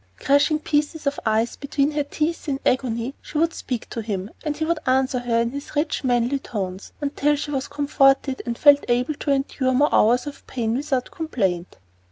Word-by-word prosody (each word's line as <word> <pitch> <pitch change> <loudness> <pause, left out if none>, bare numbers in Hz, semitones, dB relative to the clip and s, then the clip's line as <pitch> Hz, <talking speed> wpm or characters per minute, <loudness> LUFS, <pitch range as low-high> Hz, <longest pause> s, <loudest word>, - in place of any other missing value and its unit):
Crushing 285 +2 +3
pieces 300 0 -1
of 280 0 0
ice 220 +2 +1
between 280 0 0
her 300 0 0
teeth 310 +2 -2
in 270 -1 -1
agony, 250 0 0
she 300 - -6
would 330 +1 +2
speak 245 -4 -4
to 230 - -3
him 205 -2 -4
and 300 -2 -2
he 315 - -1
would 335 0 0
answer 260 0 +2
her 240 -1 0
in 235 0 -1
his 280 +2 -7
rich, 295 +1 0
manly 245 +1 +1
tones 195 -6 -5
until 290 +1 +1
she 290 +1 -4
was 270 -2 -2
comforted 275 -2 +2
and 235 -2 -4
felt 285 -1 +6
able 250 +5 +1
to 290 - -5
endure 270 -1 0
more 290 +3 +3
hours 240 +5 +4
of 290 -1 -9
pain 230 -3 -1
without 265 -2 -1
complaint. 190 - -2
275 Hz, 195 wpm, -23 LUFS, 240-295 Hz, -, felt